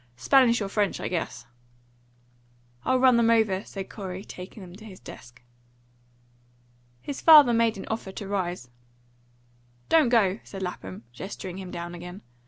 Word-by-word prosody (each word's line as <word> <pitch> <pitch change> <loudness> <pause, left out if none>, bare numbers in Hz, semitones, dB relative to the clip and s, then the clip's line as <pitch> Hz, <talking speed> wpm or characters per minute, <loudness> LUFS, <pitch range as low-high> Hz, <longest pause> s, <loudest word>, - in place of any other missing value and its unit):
Spanish 235 - +4
or - - -3
French, 200 0 0
I - - -3
guess." 165 -9 -4 1.4
"I'll 260 - +2
run 255 -2 +5
them 230 -1 +3
over," 215 -4 +2
said 195 -1 -7
Corey, 190 -1 -7
taking 185 +3 -10
them 175 -1 -12
to 215 - -14
his 190 -4 -11
desk. 120 +1 -13 1.6
His 280 - -5
father 295 -7 +8
made 230 -2 +2
an 195 - -7
offer 220 -3 -4
to 200 - -7
rise. 180 -10 -3 1.2
"Don't 310 -6 +5
go," 210 -4 +3
said 195 -1 -7
Lapham, 95 - -6
gesturing 185 +5 -7
him 185 -2 -7
down 175 0 -6
again. 175 +3 -9
195 Hz, 150 wpm, -26 LUFS, 180-230 Hz, 1.6 s, father